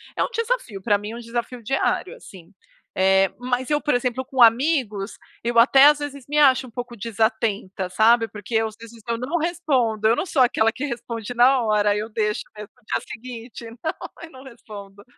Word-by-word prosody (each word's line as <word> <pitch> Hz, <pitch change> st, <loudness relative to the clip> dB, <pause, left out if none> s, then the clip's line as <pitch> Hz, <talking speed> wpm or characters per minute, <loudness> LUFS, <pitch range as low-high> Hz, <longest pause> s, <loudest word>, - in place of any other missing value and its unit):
é -, -, +1 dB
um -, -, -2 dB
desafio, 460 Hz, -, -3 dB
para 205 Hz, -2 st, +3 dB
mim 210 Hz, +1 st, -7 dB
é -, -, -7 dB
um -, -, -7 dB
desafio 235 Hz, +1 st, -5 dB
diário, 270 Hz, -, -1 dB
assim. 190 Hz, -, -15 dB, 0.4 s
Eh, 190 Hz, 0 st, +4 dB
mas 250 Hz, +2 st, -2 dB
eu 295 Hz, -, +2 dB
por 295 Hz, -4 st, +1 dB
exemplo 250 Hz, +1 st, -1 dB
com 260 Hz, 0 st, -7 dB
amigos, 230 Hz, -5 st, +2 dB, 0.3 s
eu 235 Hz, 0 st, -1 dB
até 270 Hz, +4 st, +7 dB
às 300 Hz, 0 st, +5 dB
vezes 280 Hz, -3 st, -7 dB
me 300 Hz, -, -1 dB
acho 265 Hz, -3 st, +4 dB
um -, -, -15 dB
pouco 245 Hz, +1 st, -7 dB
desatenta, 220 Hz, -3 st, -2 dB
sabe? 225 Hz, +4 st, +3 dB
Porque 210 Hz, +1 st, -10 dB
eu 220 Hz, 0 st, +2 dB, 0.5 s
não 270 Hz, +8 st, -2 dB
respondo, 270 Hz, -11 st, 0 dB
eu 230 Hz, -, +4 dB
não 380 Hz, -, -3 dB
sou 265 Hz, -5 st, +3 dB
aquela 225 Hz, -2 st, +2 dB
que 270 Hz, +5 st, -5 dB
responde 235 Hz, -3 st, -5 dB
na 255 Hz, +2 st, +4 dB
hora, 210 Hz, -1 st, +2 dB
aí 205 Hz, -, +1 dB
eu 220 Hz, +2 st, -5 dB
deixo 210 Hz, -1 st, -1 dB
mesmo 210 Hz, -1 st, -9 dB
no 250 Hz, -, -29 dB
dia -, -, -2 dB
seguinte, 235 Hz, 0 st, -9 dB, 0.2 s
não, 315 Hz, -, -1 dB, 0.3 s
eu 330 Hz, -, -9 dB
não 260 Hz, 0 st, -13 dB
respondo. 205 Hz, -5 st, -12 dB
235 Hz, 200 wpm, -22 LUFS, 215-265 Hz, 0.5 s, até